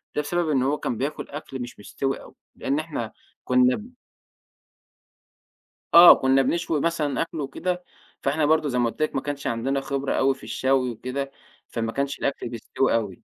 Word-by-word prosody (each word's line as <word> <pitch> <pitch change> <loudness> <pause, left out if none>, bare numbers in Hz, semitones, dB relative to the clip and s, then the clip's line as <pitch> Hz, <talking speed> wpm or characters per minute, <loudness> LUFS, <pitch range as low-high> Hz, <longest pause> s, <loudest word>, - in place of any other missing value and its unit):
ده 150 - +2
بسبب 170 +2 -1
إن 135 -4 +2
هو 140 +3 +1
كان 120 - -3
بياكل 140 +5 -3
أكل 135 -2 -7
مش 120 -3 -8
مستوي 135 +6 -3
أوي، - - -15 0.2
لأن 140 +3 -1
إحنا 150 -8 -4 0.3
كنا 125 0 +4
ب 220 +3 -9 2.0
آه، 170 +1 +11
كنا 135 +1 +3
بنشوي 165 +2 0
مثلًا 160 -3 0
أكل 165 -1 -3
وكده، 180 +6 -3 0.4
فإحنا 150 +2 +1
برضه 155 0 +3
زي 125 - -1
ما 120 -1 +2
قُلت 135 - -9
لِك 155 - 0
ما 135 - +1
كانش 145 -1 -4
عندنا 135 +4 -1
خبرة 135 0 -2
أوي 135 0 +2
في - - -18
الشوي 130 -1 +1
وكده، 130 +4 -4 0.4
فما 115 -1 -3
كانش 140 +2 -2
الأكل 140 -3 -2
بيستوي 120 +2 0
أوي. 105 -5 -2
135 Hz, 175 wpm, -25 LUFS, 125-150 Hz, 2.0 s, آه